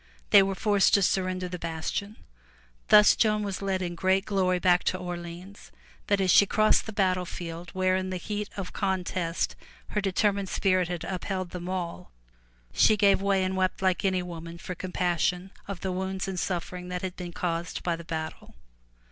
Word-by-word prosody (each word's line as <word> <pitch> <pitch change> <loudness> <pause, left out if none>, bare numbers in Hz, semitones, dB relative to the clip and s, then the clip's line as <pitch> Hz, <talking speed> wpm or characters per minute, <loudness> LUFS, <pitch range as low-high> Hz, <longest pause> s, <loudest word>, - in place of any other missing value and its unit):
They 205 - +9
were 195 0 0
forced 205 0 +3
to 200 - +3
surrender 185 -1 0
the 180 0 -6
bastion. 165 +6 -4 0.7
Thus 210 0 +7
Joan 215 -1 +2
was 200 -2 -4
led 190 -1 -1
in 175 -1 -3
great 190 +2 +1
glory 185 -3 +1
back 180 0 +3
to 185 - +1
Orleans, 175 +2 -8 0.4
but 200 -1 +2
as 190 -2 +3
she 200 - +6
crossed 215 +2 +3
the - - -4
battlefield 180 -4 -2
where 185 0 +2
in 185 0 -2
the 185 - -3
heat 210 +3 -4
of 195 -2 -5
contest 185 -3 -1 0.3
her 210 - -1
determined 200 0 0
spirit 185 -2 +2
had 175 -1 -4
upheld 185 -1 -3
them 180 0 -6
all, 175 - -4 0.6
she 215 - +5
gave 200 -2 +4
way 195 -1 +2
and 185 0 -1
wept 185 0 0
like 185 +1 +2
any 185 -2 +1
woman 170 -1 -8
for 180 - -6
compassion 180 0 -1 0.2
of 195 -3 -6
the 190 - -2
wounds 190 +1 -3
and 190 -2 -3
suffering 180 0 -3
that 180 0 -4
had 185 -1 -4
been 175 -1 -6
caused 170 -1 -3
by 175 -1 0
the 170 - -9
battle. 160 -1 -6
185 Hz, 180 wpm, -27 LUFS, 180-195 Hz, 0.7 s, They